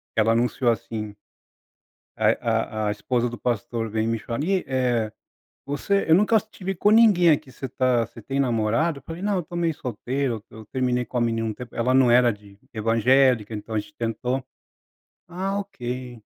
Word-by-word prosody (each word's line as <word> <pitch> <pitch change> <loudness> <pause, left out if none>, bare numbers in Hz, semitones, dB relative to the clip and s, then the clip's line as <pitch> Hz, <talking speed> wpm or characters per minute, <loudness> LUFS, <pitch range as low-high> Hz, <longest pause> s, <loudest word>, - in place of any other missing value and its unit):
ela 110 +1 +3
anunciou 120 +1 +2
assim, 110 -3 -5 1.0
a 110 0 +1
a - - +1
a - - +1
esposa 120 +4 -1
do 120 - -7
pastor 115 -1 -2
veio 110 +1 -1
me 115 - -1
chamar 115 +4 -5
ni 185 +5 +1
eh, 125 -4 0 0.5
"Você 170 +8 0
eu 160 - +7
nunca 210 +3 +4
te 215 -3 -15
vi 195 +1 -1
com 205 +4 +2
ninguém 210 -7 +6
aqui, 145 -3 0
você 135 - -6
tá 125 -1 +1
você 115 - -13
tem 135 +5 -2
namorado?" 125 +6 +1
Eu 140 - -17
falei: 165 +2 -7
"Não, 205 -1 +1
estou 175 +1 -8
meio 165 -2 0
solteiro, 125 -1 -3
eu 110 -1 -12
terminei 125 0 0
com 125 +2 -4
a - - +1
menina 115 -1 0
um 110 - -3
tempo, 125 +2 -10
ela 125 +2 +1
não 130 -2 +5
era 120 0 +5
de 100 -1 -15 0.2
evangélica 115 +1 +3
então 110 +1 -5
a - - +3
gente 130 +9 -7
tentou". 125 +2 -2 0.9
"Ah 190 +3 -2
ok. 125 - -6
125 Hz, 185 wpm, -24 LUFS, 115-145 Hz, 1.0 s, eu